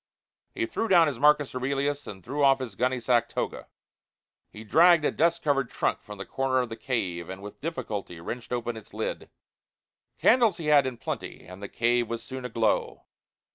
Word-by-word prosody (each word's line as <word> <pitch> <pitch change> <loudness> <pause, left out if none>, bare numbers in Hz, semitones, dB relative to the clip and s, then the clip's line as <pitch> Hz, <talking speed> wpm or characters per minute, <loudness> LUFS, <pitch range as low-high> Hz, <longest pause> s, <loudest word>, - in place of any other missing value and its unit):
He 340 - 0
threw 275 -9 -2
down 175 -5 +6
his 140 -6 -3
Marcus 150 -1 +4
Aurelius 140 +3 -2
and 95 -3 -9
threw 140 +4 -2
off 135 -1 +6
his 130 -5 -6
gunny 125 +4 0
sack 120 0 +2
toga. - - -4 0.8
He 105 - -11
dragged 165 +6 +5
a - - +2
dust 170 +1 +1
covered 135 -5 +1
trunk - - -1
from 105 -1 -10
a 100 - -5
corner 130 +6 -1
of 125 -2 0
the 115 - -5
cave, 90 -10 -3
and 95 0 -6
with 105 - -10
difficulty 105 - -5
wrenched 115 +8 -7
open 120 -1 -2
its 110 -2 -12
lid. - - -4 0.9
Candles 235 -2 +4
he 165 - -6
had 145 -3 +5
in 125 -2 -5
plenty, - - -6
and 90 +2 -11
the 100 - -6
cave 120 0 +1
was 115 0 -4
soon 130 -1 -7
aglow. 115 -3 0
130 Hz, 190 wpm, -27 LUFS, 115-145 Hz, 0.9 s, down